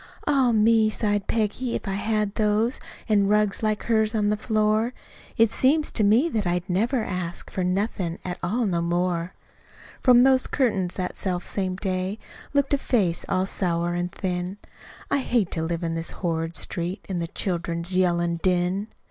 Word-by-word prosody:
"Ah, 270 -4 +3
me!" 220 0 +4
sighed 205 -2 -1
Peggy. 230 +3 -1
"If - - -5
I 195 - -1
had 210 0 -1
those 215 +3 +1 0.3
An' 205 -3 +3
rugs 210 -1 +2
like 215 -1 0
hers 220 -1 +1
on 210 -1 +2
the - - +2
floor, 215 +2 +1 0.4
It 225 -1 +4
seems 295 +6 +2
to 220 - 0
me 220 +10 +4
that 215 - -1
I'd 175 +1 -1
never 225 +7 +1
ask 180 -3 -4
For 185 - -2
nothin' 180 -2 -1
at 180 -1 -4
all 225 +8 0
no 175 -4 0
more."..... 175 0 -1 0.7
From 245 -2 +6
out - - +6
those 260 -1 +4
curtains 205 -9 0
that 180 -1 -3
selfsame 185 0 -2
day, 185 +1 -2 0.3
Looked 280 -1 +1
a 285 - +3
face 190 -11 0
all 185 0 +1
sour 175 -3 -1
an' 175 0 -2
thin. 180 +1 -3 0.5
"I 280 - +3
hate 240 -7 0
to 160 - -2
live 170 +1 -2
on 165 -1 -1
this 165 0 -2 0.2
horrid 165 0 -1
street, 175 +3 -4
In 185 -3 -2
the 170 - -2
children's 170 0 -2
yellin' 175 -2 +2
din! 185 +2 +1
195 Hz, 175 wpm, -25 LUFS, 175-220 Hz, 0.7 s, From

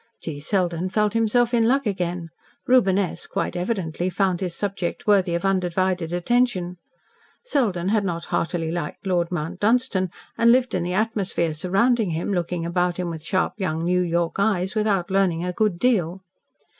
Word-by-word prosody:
G. 150 -3 -6
Selden 175 +2 -1
felt 210 +1 +1
himself 230 +2 +2
in 230 -1 +3
luck 270 +2 +2
again. 180 -4 -2 0.4
Reuben 230 -7 +4
S., 185 -3 -2
quite - - -2
evidently, 180 -2 -2
found 185 -1 0
his 180 -3 -3
subject 195 +1 -3
worthy 195 -5 +3
of 170 - -2
undivided 185 -2 0
attention. 180 -1 0 0.7
Selden 210 - 0
had 215 0 +2
not 170 -3 -3
heartily 165 -1 -1
liked 170 0 -5
Lord 175 -2 0
Mount 175 +1 -3
Dunstan, 215 -4 +1 0.3
and 230 0 +6
lived 255 0 +3
in 185 - 0
the 175 +1 -2
atmosphere 195 -6 0
surrounding 195 +7 +1
him, 165 +5 -2
looking 175 -1 -2
about 175 0 0
him 180 -2 -2
with 160 -1 -6
sharp 185 +4 0
young 165 -4 -1
New 180 +1 +2
York 170 -1 0
eyes, 195 -3 +1
without 205 -4 0
learning 180 -3 +1
a 180 - -2
good 210 -2 +1
deal. 190 -5 +1
185 Hz, 170 wpm, -23 LUFS, 175-210 Hz, 0.7 s, and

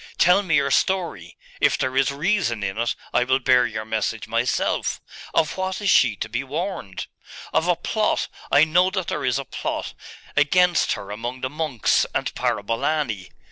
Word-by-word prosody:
Tell 180 +3 +5
me 175 -6 +1
your 145 -2 +2
story. 170 - 0 0.2
If - - +3
there 130 0 -2
is 135 -1 +3
reason 145 - 0
in 95 -1 -2
it, 120 0 0 0.2
I - - +4
will 130 +1 +2
bear 125 -2 +4
your 110 -1 -5
message 110 -1 -2
myself. - - 0 0.4
Of 155 - +1
what 190 0 -2
is 205 -2 +2
she 120 -5 +4
to - - -4
be 120 +4 -3
warned?' 145 - -4 0.5
'Of - - +2
a - - +3
plot - - 0 0.2
I 145 - +6
know 175 +4 +3
that 190 -2 -3
there - - -3
is 125 -1 +1
a 140 - -4
plot - - -4 0.4
against 175 +5 +3
her 100 - -7
among 120 +4 -5
the 130 - -2
monks 150 -6 +1
and - - -1
Parabolani. 115 -1 -1
135 Hz, 180 wpm, -23 LUFS, 115-175 Hz, 0.5 s, I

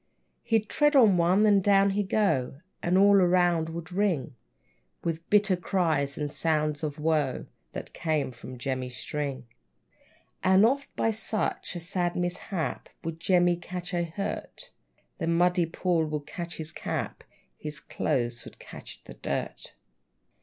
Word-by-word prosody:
He'd 225 -2 +1
tread 295 +4 +3
on 225 -8 +7
one, 180 +4 +4
then 205 -2 +5
down 195 0 +4
he'd 200 -1 -1
go, 140 -10 +1 0.2
And 175 +2 +2
all 200 +1 +6
around 175 -3 +3
would 170 +2 -6
ring 180 -9 0 0.7
With 165 0 -3
bitter 205 -2 +4
cries, 160 -6 0
and 150 -1 -2
sounds 155 -2 +1
of 150 -1 -3
woe, 150 -4 0 0.3
That - - -7
came 155 -5 -1
from 125 +1 -10
Jemmy 130 0 -3
String. 140 +1 -4 1.0
And 190 +3 +6
oft, 275 +4 +1
by 225 - +1
such 215 -3 -2
a - - -3
sad 175 0 -2
mishap, 175 -1 -3
Would 165 0 -5
Jemmy 175 0 +3
catch 180 +1 -6
a 175 - +1
hurt; 200 - -5 0.5
The 165 - -2
muddy 175 +1 +3
pool 165 -1 0
would 150 -1 -4
catch 170 +1 -6
his 155 -1 -6
cap, - - -4 0.3
His 150 -1 -6
clothes 120 -5 -2
would - - -12
catch - - -11
the - - -11
dirt! - - -4
175 Hz, 145 wpm, -28 LUFS, 155-195 Hz, 1.0 s, on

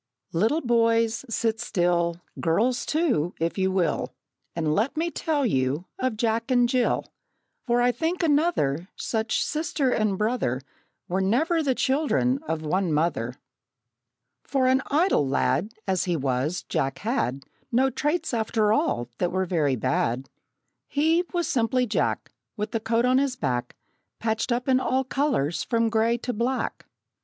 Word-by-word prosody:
Little 225 - +2
boys, 230 -1 +2
sit 225 0 0
still 175 -1 0 0.2
Girls, 235 +11 +1
too, 265 - +1
if 165 +4 -1
you 190 0 +2
will 185 -3 0 0.4
And 160 -2 0
let 225 - 0
me 335 +2 0
tell 305 -5 0
you 135 - 0
of 255 -4 -1
Jack 230 +2 0
and 245 -2 +4
Jill; 250 0 +1 0.6
For 240 0 +3
I 245 - +4
think 335 +7 -2
another 285 - +1
Such 220 -1 -1
sister 300 -3 -1
and 215 -4 +1
brother 210 - 0 0.5
Were 185 +2 0
never 310 - +2
the 270 -4 +1
children 270 -1 +1
of 160 -1 -2
one 180 +3 0
mother! 150 -6 0 1.1
For 270 -2 0
an 260 +1 +4
idle 300 - +2
lad, 135 - +1 0.2
As 190 -2 +1
he 175 -2 0
was, 135 +5 -1
Jack 135 0 -1
had 170 - -1 0.3
No 260 +3 +3
traits, 300 +1 -1
after 220 -2 +1
all, 120 - 0
that 180 - 0
were 185 +1 0
very 155 -7 +1
bad. 125 +2 -1 0.6
He, 320 +4 +2
was 345 -2 -1
simply 250 +1 +1
Jack, 225 - -1 0.3
With 210 +1 -3
the 225 - 0
coat 230 +2 +1
on 255 +1 +4
his 275 -2 0
back 125 - -2 0.4
Patched 220 +2 -1
up 245 +2 0
in 260 -1 +4
all 260 0 +1
colors 255 - 0
from 230 -1 +1
gray 230 +1 +2
to 245 +1 -4
black. 245 +4 -2
230 Hz, 150 wpm, -25 LUFS, 170-260 Hz, 1.1 s, and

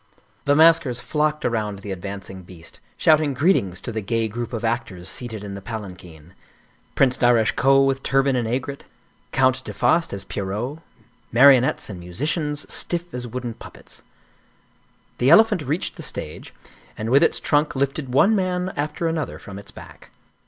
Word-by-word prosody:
The 145 - +3
maskers 160 -5 +4
flocked 150 +2 -1
around 105 -4 -1
the 100 - -6
advancing 95 0 -7
beast, 85 -2 -13 0.2
shout 155 -1 +4
ing 145 -3 -1
greetings 125 - +1
to - - -5
the 110 -1 -3
gay 115 +2 -1
group 115 +2 -5
of 115 -1 -3
actors 110 -6 -3
seated 110 -1 -5
in 100 -1 -6
the 100 - -7
palan 105 -3 -6
quin; 85 -1 -15 0.6
Prince 130 -1 +3
Darasche 120 -3 +3
Koh 135 +2 +4
with 135 0 +1
turban 135 0 +2
and 120 -2 -1
aigrette, 135 +4 -4 0.5
Count 130 0 +2
de - - -6
Faast 165 0 +2
as 100 -1 -5
Pierrot, 105 +10 -4 0.5
marionettes 130 +1 +5
and 95 -4 -8
musicians, 150 - -3
stiff 175 0 -2
as 125 -1 -4
wooden 120 0 -5
puppets. - - -13 1.2
The 125 - +3
elephant 210 +2 +6
reached 150 +5 -3
the - - -7
stage, - - -6 0.5
and 110 +2 -3
with 140 +2 +6
its - - +3
trunk 150 +1 +1
lifted 135 0 -2
one 200 - +4
man 185 -1 -1
after 150 +3 -2
another 160 -2 -3
from 100 0 -10
its 100 - -12
back. - - -13
125 Hz, 165 wpm, -22 LUFS, 105-150 Hz, 1.2 s, elephant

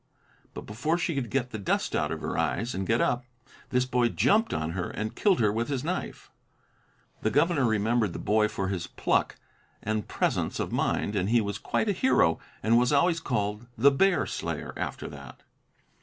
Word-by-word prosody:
But - - -5
before 140 +11 -1
she 170 -1 -1
could 135 -5 -2
get 125 0 -1
the 110 - -5
dust 100 - -1
out - - 0
of - - -4
her - - -3
eyes 115 +6 -1
and 95 +1 -3
get 115 +1 +2
up, 125 +1 +1 0.5
this 125 0 +2
boy 125 -2 +2
jumped 220 - +2
on 80 +1 -2
her 90 0 -3
and 110 0 -4
killed 200 -3 +2
her 105 -3 +3
with 115 +2 -1
his 135 -2 -2
knife. 180 +4 -4 0.9
The 110 - +1
governor 145 +1 +2
remembered 110 -2 +1
the - - -5
boy 105 0 +2
for 95 -3 -3
his 90 -3 -3
pluck - - 0 0.5
and 110 0 -2
presence - - -1
of - - -2
mind 105 - 0
and 95 0 0
he 120 +1 +4
was 100 -2 -3
quite - - -1
a - - +3
hero 185 - +3 0.2
and 115 +3 +4
was 125 +2 +2
always 165 +4 +3
called 105 -5 -2
"The 140 +6 +6
Bear 195 +8 +3
Slayer" - - -4
after - - -4
that. - - -11
115 Hz, 195 wpm, -27 LUFS, 105-140 Hz, 0.9 s, The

